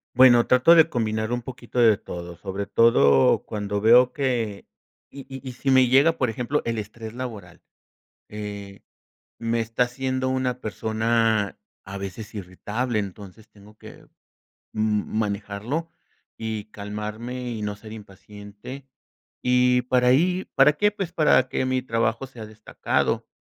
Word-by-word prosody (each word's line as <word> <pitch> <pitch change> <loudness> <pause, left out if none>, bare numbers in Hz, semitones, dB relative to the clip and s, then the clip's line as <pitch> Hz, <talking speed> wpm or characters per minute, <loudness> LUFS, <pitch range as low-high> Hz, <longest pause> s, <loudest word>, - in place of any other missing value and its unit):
Bueno, 120 -2 +7
trato 130 +7 +6
de 160 -2 +6
combinar 110 -1 -2
un 120 0 -2
poquito 125 0 -8
de 110 -4 +6
todo, 85 -1 -8
sobre 100 +3 -5
todo 70 -15 +4
cuando 105 -1 -3
veo 125 +3 +6
que 120 -7 -2 0.4
y 140 - -10
y 135 0 -9
y 125 - -6
si 135 +2 -2
me 130 -1 +6
llega 140 +6 +4
por 125 - +1
ejemplo 125 +6 -2
el 115 -1 -2
estrés 110 +1 -7
laboral, 110 -9 -8 0.7
eh, 100 -1 -8 0.6
me 115 0 -1
está 115 +2 0
haciendo 130 +1 -2
una 130 -1 -1
persona 110 -1 0 0.3
a 100 +1 -7
veces 100 +3 -7
irritable, 105 +5 -3
entonces, 100 +2 -9
tengo 105 +1 -18
que, - - -14 0.7
mm, 110 0 -1
manejarlo, 105 +9 -3 0.5
y 110 -2 -4
calmarme 105 +5 -6
y 110 -3 -5
no 105 0 -3
ser 110 +1 -12
impaciente, 105 +5 -11 0.5
y 125 0 +3
para 125 0 +2
ahí 180 +8 +2
¿para 135 +2 +6
qué?, 210 +5 +2
pues, 195 -4 -5
para 150 -6 +3
que 130 - -1
mi 130 0 0
trabajo 115 +1 -1
sea 120 -4 -10
destacado, 110 0 -2
115 Hz, 145 wpm, -24 LUFS, 105-125 Hz, 0.7 s, Bueno